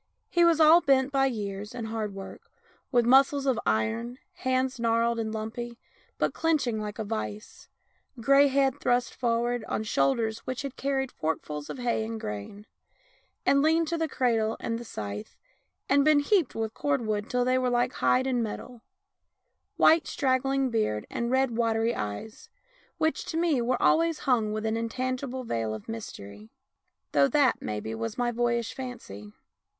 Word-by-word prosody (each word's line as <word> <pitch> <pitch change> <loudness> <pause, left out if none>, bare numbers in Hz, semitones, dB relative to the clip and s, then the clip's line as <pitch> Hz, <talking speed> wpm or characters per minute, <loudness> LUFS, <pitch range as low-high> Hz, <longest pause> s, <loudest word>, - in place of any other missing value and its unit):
He 345 - +3
was 335 -2 +4
all 320 +2 +7
bent 270 -2 +3
by 270 -1 +3
years 205 -4 -5
and 235 -2 -4
hard 215 -3 -3
work, 195 0 -10 0.4
with 240 -3 +3
muscles 270 +3 +4
of 260 -4 +1
iron, 110 - 0 0.2
hands 260 -1 -1
gnarled 230 0 +1
and 220 -1 -2
lumpy, 225 +2 -5 0.4
but - - 0
clinching 280 -9 0
like 210 -1 -5
a 220 - -2
vice; 215 0 -6 0.5
grey 275 +4 +5
head 275 0 +1
thrust 245 0 +1
for 235 -2 0
ward 240 0 -1
on 215 - -2
shoulders 220 +6 +1
which 255 +2 -5
had 275 -2 -5
carried 270 -1 -1
forkfuls 150 -2 -4
of - - -5
hay 240 -3 0
and 225 0 -5
grain, 105 - -6 0.8
and 280 - +4
leaned 320 +2 +3
to 335 - -1
the 325 - 0
cradle 225 -5 0
and 230 0 -3
the - - -7
scythe, 105 - -7 0.5
and 280 +1 +4
been 300 -1 +5
heaped 345 - +1
with 225 -1 -2
cordwood 225 -7 -1
till 250 0 +1
they 255 0 +2
were 255 -1 +1
like 245 0 +1
hide 255 +1 +2
and 255 -2 0
metal; 230 +2 -6 1.0
white 325 +1 +5
straggling 270 0 +1
beard 215 - 0
and 235 0 -2
red 260 -2 +1
watery 230 0 +1
eyes, 105 - -6 0.5
which, 315 -1 0
to 320 - -4
me, 330 -7 +2
were 245 +2 0
always 330 -1 +3
hung 230 -6 +1
with 215 +1 -3
an 220 0 0
intangible 255 +3 -3
veil 115 - -2
of 110 - -10
mystery 105 - -8 0.3
— - - -52
though 140 -1 +4
that, 280 -4 +2
maybe, 105 +1 -4
was 115 0 -4
my 245 -1 +1
boyish 235 -1 0
fancy. 105 - -8
240 Hz, 170 wpm, -27 LUFS, 215-265 Hz, 1.0 s, all